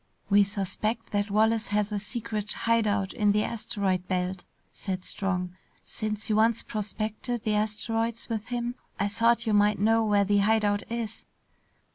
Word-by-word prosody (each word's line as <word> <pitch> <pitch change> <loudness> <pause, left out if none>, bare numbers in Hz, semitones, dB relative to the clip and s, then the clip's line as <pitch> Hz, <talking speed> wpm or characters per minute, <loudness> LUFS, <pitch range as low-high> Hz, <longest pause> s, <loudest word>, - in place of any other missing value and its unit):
"We 200 0 +7
suspect 215 +3 -2
that 205 0 0
Wallace 220 +2 +2
has 210 0 0
a 205 - -1
secret 215 -1 -3
hide 230 -1 +2
out 200 -2 0
in 205 -1 +3
the 210 0 +2
asteroid 195 -5 -1
belt," 185 0 -1 0.3
said 185 -1 -4
Strong. 180 -2 -2 0.3
"Since 215 0 -4
you 215 -2 +2
once 225 +1 +3
prospected 215 +2 -3
the 215 - +1
asteroids 225 +2 -1
with 225 -1 -3
him 240 0 -2 0.3
I 200 - +2
thought 230 +3 +2
you 220 - +1
might 205 0 +4
know 225 +2 +3
where 205 -2 +3
the 205 +1 +3
hide 215 +1 +3
out 205 0 +1
is." 230 -2 -4
210 Hz, 165 wpm, -28 LUFS, 200-225 Hz, 0.3 s, We